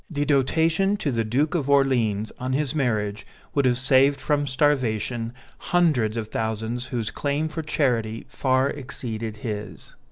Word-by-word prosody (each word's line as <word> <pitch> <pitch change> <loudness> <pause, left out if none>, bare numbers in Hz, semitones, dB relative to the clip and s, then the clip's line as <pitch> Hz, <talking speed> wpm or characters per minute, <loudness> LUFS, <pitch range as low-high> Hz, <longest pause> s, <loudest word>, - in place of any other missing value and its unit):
The 145 -3 -1
dotation 160 +8 +2
to 145 - -1
the 115 -2 0
Duke 130 +8 0
of 155 -6 -1
Orléans, 120 -7 +2
on 130 +1 -2
his 140 -1 0
marriage, 105 -8 -1 0.3
would 140 -2 +2
have 125 -1 +3
saved 135 +2 +4
from 145 0 0
starvation 125 -5 0 0.3
hundreds 140 -11 +1
of 110 -2 -3
thousands 110 +3 -2
whose 120 -4 -3
claim 145 +2 -1
for 155 +1 -4
charity 115 -8 0
far 130 0 +1
exceeded 115 -5 -5
his. 105 -5 -5
130 Hz, 150 wpm, -24 LUFS, 110-145 Hz, 0.3 s, saved